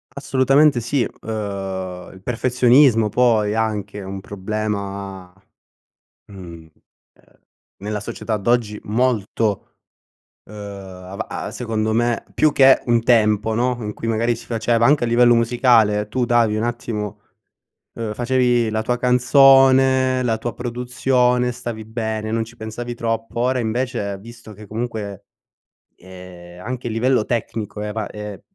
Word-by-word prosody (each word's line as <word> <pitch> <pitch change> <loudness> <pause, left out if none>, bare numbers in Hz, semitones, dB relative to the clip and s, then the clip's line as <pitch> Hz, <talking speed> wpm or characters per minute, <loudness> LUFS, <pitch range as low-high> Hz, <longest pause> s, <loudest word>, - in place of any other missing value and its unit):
Assolutamente 140 0 +3
sì. 120 +3 0
Uhm, 95 -5 -5
il 95 - -15
perfezionismo, 125 -1 +3
poi, 110 -3 +2
anche 105 -2 -2
è - - -7
un 95 +1 -6
problema, 100 -2 -5 0.9
mhmm, 100 - -13 0.3
ehm, - - -21 1.1
nella 105 +1 -4
società 110 +2 -4
d'oggi 105 0 0
molto, 110 -2 -1 0.7
uhm, 105 - -15
ava 100 -2 -8
a - - -5
secondo 110 -2 -2
me 120 +1 0
più 155 - +3
che 135 -1 +5
un 120 -1 +2
tempo, 110 -2 +3
no, 125 +1 0
in 105 -1 -4
cui 115 - -6
magari 115 +1 +1
si - - -12
faceva 115 0 +1
anche 145 0 +4
a - - -3
livello 120 +1 +5
musicale 115 -3 +3
tu 125 +2 0
davi 115 -3 +2
un 110 - -1
attimo, 105 -4 -4 0.7
uhm, 115 -2 -4
facevi 125 -1 +1
la 110 0 -1
tua 125 +2 -1
canzone, 130 +1 +5
la 115 -3 0
tua 120 +1 -4
produzione, 125 0 0
stavi 120 -2 -6
bene, 110 -1 -4
non 115 0 0
ci 115 +2 -14
pensavi 120 +2 -6
troppo, 115 0 -3
ora 125 +1 +1
invece, 115 -3 -2
visto 115 +1 -12
che 105 +1 -13
comunque, 110 -3 -5 0.7
ehm, 90 -1 -13
anche 125 +1 -5
a - - -5
livello 115 +1 +1
tecnico 110 -3 -4
è 105 - -3
avan 105 0 -4
è 105 -1 -8
115 Hz, 140 wpm, -20 LUFS, 105-125 Hz, 1.1 s, che